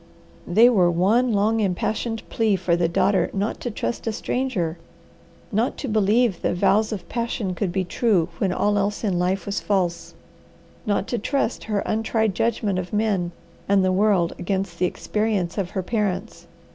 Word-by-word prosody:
They 220 +7 +6
were 190 -8 +4
one 210 +9 +2
long, 215 +2 +2
impassioned 220 +3 -2
plea 220 -3 +1
for 180 -2 +1
the 170 -1 +1
daughter 190 +3 +2
not 200 +3 -2
to 245 - -3
trust 230 +1 -4
a - - +1
stranger, 210 -8 -2 0.7
not 225 +4 0
to 275 - -4
believe 215 0 +2
that - - 0
vows 200 +4 +2
of 195 -5 -5
passion 230 -5 -2
could 180 +1 -2
be 190 +1 0
true 185 -3 +1
when 195 - +1
all 205 +3 +1
else 205 +2 -1
in 190 -5 0
life 180 +1 0
was 200 +1 -2
false, 180 -4 -1 0.7
not 205 -1 +1
to 240 - -1
trust 250 +2 -1
her 210 -2 -1
untried 220 -1 0
judgment 210 -2 0
of 180 -1 -6
men 210 -5 0 0.4
and 195 -1 +4
the 185 - +2
world 185 -3 +2
against 190 -2 -2
the 180 - +3
experience 210 -3 -1
of 185 -3 -2
her 190 - -3
parents. 200 -3 -2
200 Hz, 170 wpm, -23 LUFS, 185-220 Hz, 0.7 s, They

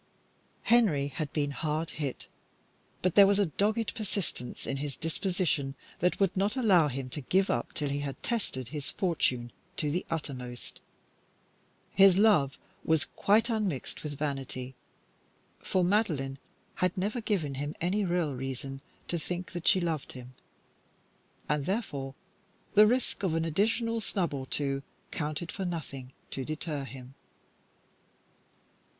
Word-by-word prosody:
Henry 185 -13 +4
had 145 +1 -4
been 145 -2 0
hit - - -8
hard, 155 -3 -2 0.8
but 185 -2 +3
there 200 -1 +9
was 200 0 +4
a 205 - +4
dogged 210 +7 0
persistence 200 - -2
in 135 - -1
his 140 0 -3
disposition 160 -4 0 0.2
that 180 +1 +2
would 195 -3 +2
not 200 +4 +1
allow 195 - +5
him 135 -1 -3
to 145 - -4
give 190 +8 +2
up - - -1
till 145 -3 0
he 140 +1 -1
had 140 -2 -5
tested 130 - -1
his 150 -2 -4
fortune 130 -10 0 0.3
to 150 -2 0
the 175 +4 0
uttermost. 130 -6 -5 1.1
His 195 -2 +7
love 195 -11 +4 0.3
was 160 -1 +3
quite 215 +3 +3
unmixed 210 - -1
with 145 -2 -4
vanity, 135 -3 -3 0.9
for 185 - +1
Madeline 160 -9 +1 0.4
had 180 0 +1
never 210 +6 -1
given 185 -10 0
him 145 +3 -3
any 190 +5 +1
real 175 -5 +1
reason 135 +1 -5 0.3
to 170 - -1
think 180 +3 -4
that 175 -2 -4
she 190 - +6
loved 165 -5 -2
him, 125 0 -10 1.1
and, 150 -1 0
therefore, 145 - -2 0.6
the 210 +1 +8
risk 250 -2 +1
of 180 -5 +1
an 165 0 +1
additional 225 +7 +1
snub 180 -6 0
or 135 -1 -4
two 135 -1 -1 0.3
counted 155 +2 -3
for 195 - -4
nothing 145 -7 -5 0.2
to 135 - -2
deter 155 -1 -3
him. 130 0 -10
160 Hz, 145 wpm, -30 LUFS, 140-195 Hz, 1.1 s, there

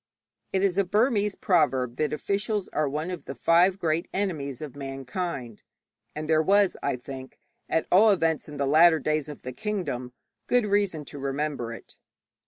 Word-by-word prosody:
It 190 0 +1
is 195 -1 +2
a - - +4
Burmese 210 +1 +1
proverb 135 - +1
that 155 - 0
officials 200 +5 -1
are 150 -1 0
one 155 +5 -3
of 180 - -6
the 135 - -6
five 175 +8 +4
great 165 -2 0
enemies 150 -10 -2
of 150 -4 -7
mankind, 135 - -5 0.5
and 155 0 -4
there 155 0 +4
was, 200 +3 +3
I - - 0
think 130 +1 -9 0.3
(at 160 - +1
all 210 +5 +7
events 165 -6 +1
in 145 - -8
the 140 - 0
latter 160 +4 +6
days 155 -1 -1
of 145 - -9
the 130 - -6
kingdom) 130 - -3 0.3
good 245 -3 +3
reason 200 -7 0
to 145 - -9
remember 140 -3 -2
it. 115 - -11
155 Hz, 175 wpm, -26 LUFS, 140-195 Hz, 0.5 s, all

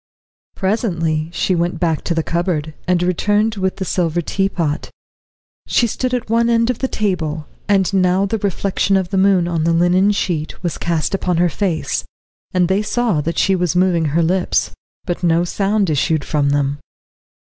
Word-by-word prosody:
Presently 170 -7 -1
she 185 - 0
went 175 0 -1
back 165 -3 0
to 170 - -1
the 165 - 0
cupboard, 170 -3 -2
and 180 -1 +2
returned 205 +5 +1
with 190 -1 -1
the 190 - -4
silver 175 -2 0
teapot. 170 -3 -1 0.8
She 240 - +3
stood 250 +3 -2
at 245 - -4
one 230 +1 +2
end 230 +1 +3
of 245 - -7
the 265 - 0
table, 165 -9 -2 0.2
and 195 -1 +2
now 185 0 +3
the 220 +2 -2
reflection 195 0 0
of 185 -2 -2
the 190 - 0
moon 190 -3 +3
on 165 -2 -1
the 165 +1 +2
linen 180 +4 +3
sheet 170 -5 -3
was 175 - -3
cast 165 -1 -1
upon 180 -3 0
her 175 +1 +3
face, 170 0 -1 0.5
and 180 -1 +2
they 190 +3 +1
saw 215 -6 0
that 165 +3 -3
she 195 - +3
was 180 -2 0
moving 180 -2 +2
her 160 +3 +1
lips 180 +2 +1 0.3
but 175 -2 -3
no 170 -1 +2
sound 200 +3 0
issued 155 0 0
from 145 -2 +1
them. 145 0 0
180 Hz, 180 wpm, -18 LUFS, 165-195 Hz, 0.8 s, She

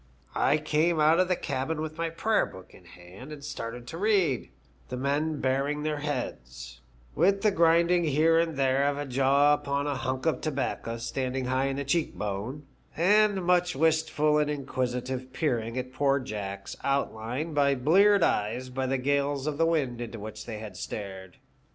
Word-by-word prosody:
I 150 - +3
came 155 +2 +1
out 155 +3 +5
of 185 - +3
the 180 - +2
cabin 140 +1 -3
with 155 +1 -5
my 165 0 0
prayer 215 +7 +1
book 95 0 -13
in - - -15
my - - -17
hand 90 +11 -12
and 145 -2 -9
started 120 -4 -6
to 160 +7 -7
read, 190 - +1 0.4
the 125 - -4
men 145 +3 -1
baring 140 +3 0
their 155 -1 -1
heads, 65 - -5 0.3
i^ith 195 +2 +3
the 210 0 +3
grinding 170 0 +3
here 160 +2 +3
and 165 -3 -1
there 135 +1 +2
of 145 0 0
a 145 - -3
jaw 135 +2 +3
upon 140 -1 -1
a 145 - -1
hunk 130 +1 -3
of 160 - +1
tobacco 135 -5 -3
standing 130 +2 -3
high 130 +1 +1
in 135 - -2
the 140 - -2
cheek 160 +4 0
bone, 105 +8 -4 0.3
and 200 +2 +3
much 180 -1 +2
wistful 155 0 +2
and 150 -1 +1
inquisitive 130 -2 -3
peering 120 -5 -1
at 130 0 -4
poor 140 +1 +2
Jack's 100 -6 -6
outline 135 +2 -2
by 145 -1 +3
eyes - - -3
bleared 195 +9 +5
by 125 +4 -1
the 135 +1 0
gales 140 +1 0
of 150 -1 -3
wind 150 -8 +1
into 115 -1 -6
which 110 +1 -8
they 110 -2 -5
had 105 -3 -8
stared. 95 -3 -7
140 Hz, 180 wpm, -28 LUFS, 125-160 Hz, 0.4 s, out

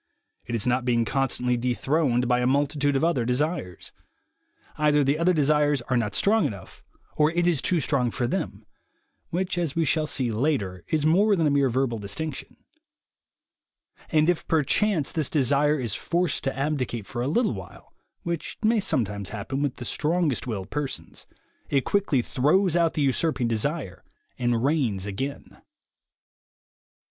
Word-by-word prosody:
It 120 - -2
is 115 - 0
not 125 0 +1
being 120 -2 +1
constantly 125 -1 0
dethroned 125 +1 0
by 125 0 +2
a 125 - +1
multitude 145 +1 +1
of 135 - +1
other 165 -7 +2
desires. 125 - -2 0.8
Either 150 -1 +3
the 140 +3 +1
other 175 +2 +3
desires 150 -4 +2
are 130 - +2
not 105 -4 -1
strong 220 +2 +3
enough, 100 -3 -10 0.4
or 150 0 +4
it 175 +1 0
is 170 -6 +2
too 180 - +2
strong 135 -4 0
for 120 +1 -2
them 120 - -3 0.6
(which, 180 +1 -2
as 165 -3 -2
we 165 -1 +1
shall 155 +2 +1
see 130 -5 0
later, 105 - -1
is 155 -2 0
more 200 +6 +4
than 165 -4 +1
a 150 - +3
mere 140 -2 +3
verbal 120 -2 -1
distinction); 120 +9 -5 1.5
and 155 -2 +3
if 175 -2 0
perchance 160 +1 +2
this 155 -4 0
desire 145 +1 +2
is 120 -5 -1
forced 175 +6 -1
to 135 - -2
abdicate 135 -6 -2
for 120 - -5
a 125 - -1
little 215 - +1
while, 95 -3 -11 0.3
which 170 -2 -4
may 220 +1 +3
sometimes 105 - -1
happen 115 +6 -4
with 145 -3 -1
the 120 - -7
strongest 155 -3 0
willed 100 -5 -5
persons, 145 -2 -5 0.4
it 135 -2 +1
quickly 185 -11 +1
throws 160 +9 +2
out 170 -2 +2
the 150 - +1
usurping 135 -1 +1
desire 115 - -2 0.4
and 120 -1 0
reigns 130 -10 0
again. 130 +8 -6
140 Hz, 160 wpm, -25 LUFS, 120-160 Hz, 1.5 s, or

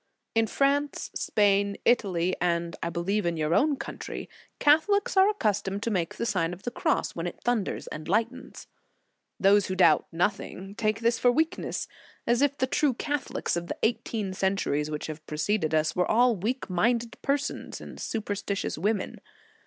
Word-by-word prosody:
In 225 0 +3
France, 280 +4 0
Spain, 200 -1 +2
Italy, 185 -7 +2
and 170 -1 0
I 170 - -1
believe 190 +5 -1
in 170 -1 -1
your 155 +1 0
own 290 - +3
country, - - -6 0.3
Catholics 320 +9 +3
are 385 +1 +6
accustomed 205 - -1
to 230 - -1
make 175 -5 -1
the 230 - -2
Sign 185 -6 0
of 180 - -11
the 245 - -3
Cross 310 +5 0
when 170 +1 -3
it - - -7
thun 240 -4 +2
ders - - -5
and 155 0 -7
lightens. 225 +6 -2 0.7
Those 200 0 +5
who 185 - -2
doubt - - +4
nothing, 195 +2 -2
take 215 +1 -1
this 230 0 +2
for 245 - +5
weakness, 320 +5 -1 0.4
as 240 +2 +2
if 285 0 +2
the 260 - +2
true 265 0 +1
Catho 290 +2 -3
lics - - 0
of 170 0 -3
the - - -4
eighteen 220 -3 -1
centuries 185 -6 0
which 150 -1 -4
have 155 0 -7
preceded 160 +1 0
us, 155 0 +1
were 180 -1 +1
all 240 +1 +4
weak 225 +8 -2
minded 230 +6 0
persons 280 +1 -2
and - - -10
superstitious 205 -5 -3
women. 205 +2 -1
205 Hz, 175 wpm, -27 LUFS, 175-245 Hz, 0.7 s, are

